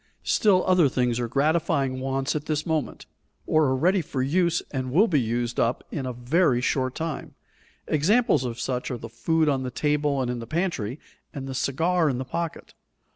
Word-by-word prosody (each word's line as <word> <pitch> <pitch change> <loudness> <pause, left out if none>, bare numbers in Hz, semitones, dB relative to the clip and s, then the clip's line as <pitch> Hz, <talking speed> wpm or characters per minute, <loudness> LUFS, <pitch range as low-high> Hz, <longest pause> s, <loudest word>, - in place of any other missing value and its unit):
Still 195 -4 +3
other 180 -6 +4
things 125 -1 0
are 120 - -1
gratifying 140 -1 +1
wants 135 +1 -1
at 150 0 -4
this 155 -1 -1
moment, 160 -4 -2 0.4
or 155 -1 +3
are 130 -1 +2
ready 180 +8 +2
for 135 -4 -3
use 170 +4 +1
and 130 -2 -3
will 195 - +5
be 150 -8 +2
used 120 +1 -2
up 120 +2 +1
in 135 -4 -3
a - - -2
very 125 +3 +2
short 130 0 0
time; 160 -3 -5 0.5
examples 185 - +2
of 120 -2 -4
such 125 -1 -2
are 125 - -3
the 115 0 -9
food 160 +8 +1
on 135 -3 +1
the 130 - -3
table 145 +1 0
and 125 -2 -1
in 125 - -4
the 115 - -7
pantry, 155 - -2 0.4
and 135 -2 -5
the 135 - -5
cigar 160 +5 +1
in 130 - -1
the 130 - -4
pocket. 170 +4 -5
140 Hz, 195 wpm, -25 LUFS, 125-160 Hz, 0.5 s, will